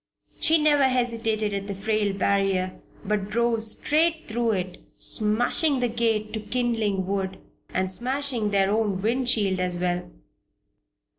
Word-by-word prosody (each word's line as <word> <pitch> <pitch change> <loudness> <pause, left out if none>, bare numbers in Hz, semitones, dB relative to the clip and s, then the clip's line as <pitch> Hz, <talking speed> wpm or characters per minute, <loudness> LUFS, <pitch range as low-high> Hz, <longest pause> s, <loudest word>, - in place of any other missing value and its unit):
She 325 0 +4
never 295 -2 +4
hesitated 230 -4 0
at 200 0 -3
the 200 - -4
frail 210 +1 0
barrier, 195 -1 0 0.2
but 205 -1 -1
drove 235 +1 +1
straight 315 +9 +1
through 230 0 0
it, 185 -2 -4
smashing 245 +7 +1
the 245 -1 +1
gate 220 -2 0
to 220 - -2
kindling 220 -4 -1
wood, 190 0 -2 0.3
and 185 0 -1
smashing 250 +1 -1
their 195 -1 +2
own 205 -3 0
wind 245 +3 +1
shield 200 -6 +1
as 180 -1 -1
well. 175 0 -2
215 Hz, 140 wpm, -25 LUFS, 195-240 Hz, 0.3 s, She